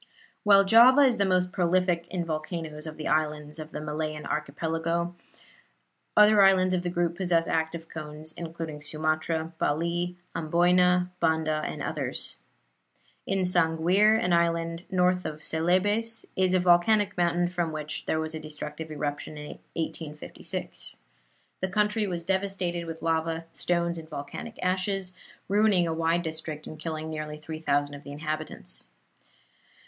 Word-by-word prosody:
While 200 -1 +6
Java 240 +7 +8
is 255 -4 +5
the 200 - +2
most 180 -1 +2
prolific 180 -2 +1
in 180 -2 -2
volcanoes 155 -1 -4
of 155 - -7
the 155 - -4
islands 150 +1 -1
of 155 0 -7
the - - -5
Malayan 155 0 -4
Archipelago, 165 +3 -2 1.0
other 210 0 +7
islands 185 -1 +5
of 180 - +1
the 175 - -2
group 175 -1 0
possess 170 -2 +2
active 160 +1 -1
cones, 155 0 -6
including 165 -3 -6
Sumatra, 155 +2 -1
Bali, 170 +4 0 0.2
Amboyna, 180 +2 +3
Banda 160 -2 +1
and - - -5
others. - - -3 0.9
In 195 0 +1
Sanguir, 180 +4 +4
an 180 -4 +1
island 170 0 +1
north 180 -1 +2
of 155 0 -6
Celebes, 205 +9 +2
is 185 0 +2
a - - +4
volcanic 180 +4 +4
mountain 175 0 +2
from 175 -2 -2
which 155 -1 -4
there 160 - +1
was 160 0 -3
a 160 - -4
destructive 155 0 -7
eruption 150 0 -4
in 150 0 -8 0.2
1856. 155 -2 -5 0.6
The 190 - -1
country 210 +2 +1
was 170 -3 -3
devastated 190 -3 -1
with 165 0 -7
lava, 165 0 0
stones 170 -1 0
and 160 -1 -11
volcanic 220 +11 -7
ashes, 185 0 0 0.3
ruining 200 -2 +4
a 165 - -1
wide 165 +1 +1
district 160 -1 -5
and 155 - -9
killing 155 0 -4
nearly 155 -1 -5
3,000 145 -2 -1
of 145 0 -9
the 145 - -9
inhabitants. 150 - -5
165 Hz, 145 wpm, -27 LUFS, 155-180 Hz, 1.0 s, Java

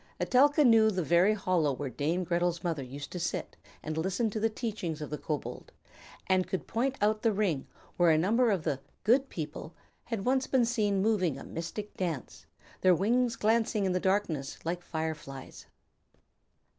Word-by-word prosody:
Etelka 290 +3 +4
knew 225 -2 +6
the 185 -4 -1
very 175 +6 +4
hollow 180 -7 +1
where 140 +1 -4
Dame 155 +8 -1
Gretel's 175 0 0
mother 165 -5 -1
used 140 +3 -8
to 180 - -5
sit 175 0 -3 0.3
and 155 +1 -3
listen 195 +6 0
to 215 - -3
the 225 +1 +2
teachings 210 -8 -4
of 150 -2 -6
the 150 - -2
kobold, 150 -2 -5 0.5
and 185 -1 +2
could 190 - -3
point 260 +4 -1
out 215 +1 +2
the 225 - +3
ring 190 -9 0 0.3
where 175 -1 +5
a 155 - +5
number 225 +9 +3
of 190 -6 0
the 135 - -1 0.2
"good 265 +5 +3
people" 155 0 -6 0.3
had 225 -5 -4
once 260 +1 +2
been 255 -3 +3
seen 210 -4 +1
moving 185 -10 +1
a - - -8
mystic 205 +6 -6
dance, 165 -8 -4 0.3
their 185 -1 +5
wings 235 +6 +1
glancing 220 -2 +1
in 190 - +1
the 180 - +1
darkness 180 -8 -1
like 175 +2 -2
fire 160 -2 -2
flies. 135 -3 -11
185 Hz, 180 wpm, -30 LUFS, 160-220 Hz, 0.5 s, knew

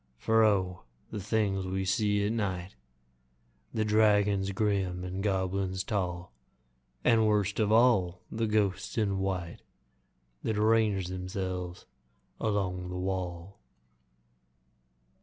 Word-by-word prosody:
For 110 - +3
O! 95 -4 +2 0.3
the 105 - -4
things 100 -2 0
we 95 +1 -2
see 105 +1 +1
at 105 - 0
night 95 -5 -2 1.0
The 110 -1 0
dragons 105 -2 +3
grim, 95 -3 0
the 90 0 -5
goblins 95 -1 -1
tall, 90 - -3 0.7
And, 110 -2 +4
worst 105 -1 +1
of 105 -1 +2
all, 110 -7 +3
the 115 0 -1
ghosts 105 -2 0
in 100 -3 +1
white 95 -3 -3 0.8
That 110 - -1
range 105 -4 +2
themselves 90 -1 -4 0.5
along 95 -4 -1
the 90 - -4
wall! 90 0 -4
95 Hz, 110 wpm, -30 LUFS, 90-105 Hz, 1.0 s, And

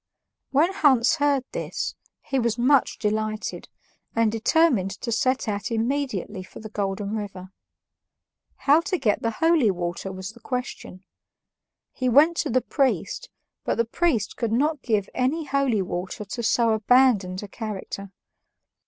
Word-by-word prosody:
When 320 +7 +3
Hans 265 -2 +4
heard 285 -3 +2
this, - - -3 0.3
he 270 - -1
was 235 -1 0
much 260 +2 +3
delighted, 215 0 -2 0.5
and 230 -1 +3
determined 230 - +2
to 235 - -3
set 255 +2 +1
out 205 -1 -2
immediately 230 -5 -2
for 185 - -12
the 220 -1 -9
Golden 200 +1 -2
River. 195 -3 -6 1.2
How 290 +3 +6
to 370 +2 -1
get 220 -9 +1
the 230 - 0
holy 320 0 +3
water 175 +1 -3
was 190 +1 -6
the 235 - -17
question. 250 -6 -5 0.9
He 255 -1 -1
went 300 +7 +5
to - - 0
the 255 +2 +2
priest, 280 - -1 0.3
but - - 0
the 230 - +2
priest 240 - 0
could 230 -2 -1
not 290 +5 +1
give 210 -4 0
any 280 +6 0
holy 270 -7 +1
water 185 +3 -5
to 195 +4 -5
so 230 0 +2
abandoned 220 -4 +3
a - - -6
character. 200 -2 -6
230 Hz, 145 wpm, -24 LUFS, 205-275 Hz, 1.2 s, How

